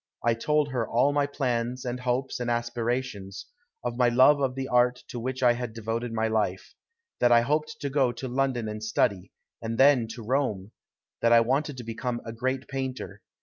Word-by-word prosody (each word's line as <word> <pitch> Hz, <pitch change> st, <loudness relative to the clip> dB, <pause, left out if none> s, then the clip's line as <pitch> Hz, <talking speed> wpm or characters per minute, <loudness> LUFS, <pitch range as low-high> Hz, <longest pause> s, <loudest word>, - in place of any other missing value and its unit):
I 115 Hz, -, +4 dB
told 150 Hz, +5 st, +1 dB
her 120 Hz, -4 st, -2 dB
all 125 Hz, +5 st, +3 dB
my 145 Hz, -1 st, +2 dB
plans 125 Hz, -3 st, -2 dB
and 125 Hz, 0 st, -3 dB
hopes 125 Hz, +2 st, -1 dB
and 120 Hz, -1 st, -2 dB
aspirations; 120 Hz, -4 st, -2 dB, 0.4 s
of 120 Hz, -1 st, -3 dB
my 125 Hz, -1 st, +4 dB
love 130 Hz, +4 st, +5 dB
of 130 Hz, -2 st, 0 dB
the 135 Hz, 0 st, -3 dB
art 125 Hz, 0 st, +2 dB
to 120 Hz, -, -5 dB
which 130 Hz, +2 st, -3 dB
I 120 Hz, -1 st, +6 dB
had 120 Hz, -2 st, -5 dB
devoted 115 Hz, +1 st, -3 dB
my 110 Hz, 0 st, 0 dB
life; 105 Hz, -4 st, -1 dB, 0.5 s
that 120 Hz, -, +4 dB
I 120 Hz, 0 st, +7 dB
hoped 150 Hz, +4 st, -1 dB
to 140 Hz, -, -2 dB
go 135 Hz, -3 st, +2 dB
to 130 Hz, -, -6 dB
London 130 Hz, -2 st, -1 dB
and 105 Hz, 0 st, -5 dB
study, 100 Hz, -4 st, 0 dB, 0.3 s
and 115 Hz, 0 st, -3 dB
then 135 Hz, -4 st, +5 dB
to 120 Hz, -, -9 dB
Rome; 110 Hz, -6 st, -1 dB, 0.5 s
that 115 Hz, -, +3 dB
I 115 Hz, 0 st, +7 dB
wanted 135 Hz, +4 st, 0 dB
to 125 Hz, -, -6 dB
become 120 Hz, +1 st, -3 dB
a 115 Hz, -, -6 dB
great 130 Hz, +3 st, -2 dB
painter. 130 Hz, -7 st, -5 dB
125 Hz, 195 wpm, -27 LUFS, 115-130 Hz, 0.5 s, I